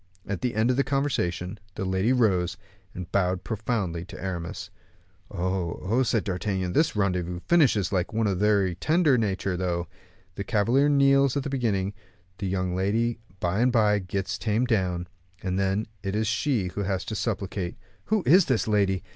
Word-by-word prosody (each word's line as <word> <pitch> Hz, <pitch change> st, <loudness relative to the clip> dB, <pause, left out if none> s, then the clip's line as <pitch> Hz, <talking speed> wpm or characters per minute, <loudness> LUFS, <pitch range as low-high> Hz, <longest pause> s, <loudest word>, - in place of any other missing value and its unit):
At 100 Hz, -, -4 dB
the 125 Hz, -3 st, -1 dB
end 110 Hz, +3 st, +3 dB
of 125 Hz, -, -1 dB
the 140 Hz, -, +3 dB
conversation 105 Hz, -10 st, -1 dB, 0.2 s
the 95 Hz, -, -3 dB
lady 95 Hz, +5 st, +1 dB
rose, 95 Hz, -9 st, +2 dB, 0.4 s
and 90 Hz, -2 st, -7 dB
bowed 90 Hz, -2 st, +1 dB
profoundly 100 Hz, -4 st, -2 dB
to 100 Hz, 0 st, -10 dB
Aramis. 85 Hz, -3 st, -5 dB, 0.6 s
"Oh, 90 Hz, -3 st, -2 dB
oh," 110 Hz, +8 st, +1 dB
said 115 Hz, -4 st, +1 dB
D'Artagnan; 95 Hz, -2 st, -2 dB
"this 155 Hz, -4 st, +2 dB
rendezvous 90 Hz, -3 st, 0 dB
finishes 130 Hz, -, +3 dB
like 90 Hz, -3 st, 0 dB
one 110 Hz, +1 st, 0 dB
of 100 Hz, -, +2 dB
a -, -, -5 dB
very 100 Hz, -3 st, +3 dB
tender 155 Hz, -, +3 dB
nature 100 Hz, -4 st, 0 dB
though. 90 Hz, -1 st, -1 dB, 0.5 s
The 100 Hz, -, -4 dB
cavalier 120 Hz, +7 st, +2 dB
kneels 140 Hz, -1 st, +4 dB
at 140 Hz, -, -1 dB
the 140 Hz, -, -4 dB
beginning, 105 Hz, -7 st, 0 dB, 0.5 s
the 100 Hz, -, -2 dB
young 90 Hz, -1 st, -1 dB
lady 110 Hz, +5 st, 0 dB, 0.2 s
by 90 Hz, +4 st, 0 dB
and 125 Hz, +2 st, +3 dB
by 105 Hz, -3 st, +3 dB
gets 95 Hz, 0 st, -3 dB
tamed 115 Hz, +3 st, 0 dB
down, 90 Hz, -6 st, 0 dB, 0.4 s
and 95 Hz, -1 st, -1 dB
then 100 Hz, +2 st, 0 dB, 0.2 s
it 100 Hz, 0 st, -3 dB
is 110 Hz, +1 st, +1 dB
she 110 Hz, -1 st, 0 dB
who 100 Hz, -, -4 dB
has 95 Hz, -2 st, -2 dB
to 105 Hz, -, -5 dB
supplicate. 100 Hz, -4 st, -3 dB, 0.3 s
Who 215 Hz, -3 st, +1 dB
is 180 Hz, +4 st, +6 dB
this 130 Hz, -5 st, +1 dB
lady? 100 Hz, -4 st, +1 dB
100 Hz, 180 wpm, -26 LUFS, 95-115 Hz, 0.6 s, is